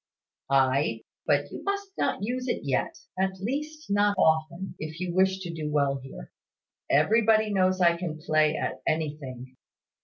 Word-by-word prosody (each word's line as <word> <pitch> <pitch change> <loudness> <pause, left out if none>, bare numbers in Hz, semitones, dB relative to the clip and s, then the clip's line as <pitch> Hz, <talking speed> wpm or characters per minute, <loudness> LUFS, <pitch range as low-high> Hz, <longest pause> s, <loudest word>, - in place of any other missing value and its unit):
"Ay; 135 -3 +2 0.2
but 145 -2 +2
you - - -7
must 400 0 -2
not - - -1
use 250 +4 -2
it 240 - -1
yet, 135 -2 -1 0.2
at 190 0 0
least, 300 +8 -4
not 205 0 +3
often, 160 +3 +1
if 155 +2 -6
you 180 -1 -3
wish 190 +1 +3
to 175 -3 -5
do 155 -2 -4
well 140 -2 +2
here. 130 - -10 0.6
Everybody 215 +7 +4
knows 185 -1 +2
I 170 -1 +5
can 170 -3 -4
play 155 -1 +2
at - - -3
anything. 135 -5 -3
170 Hz, 155 wpm, -27 LUFS, 145-205 Hz, 0.6 s, I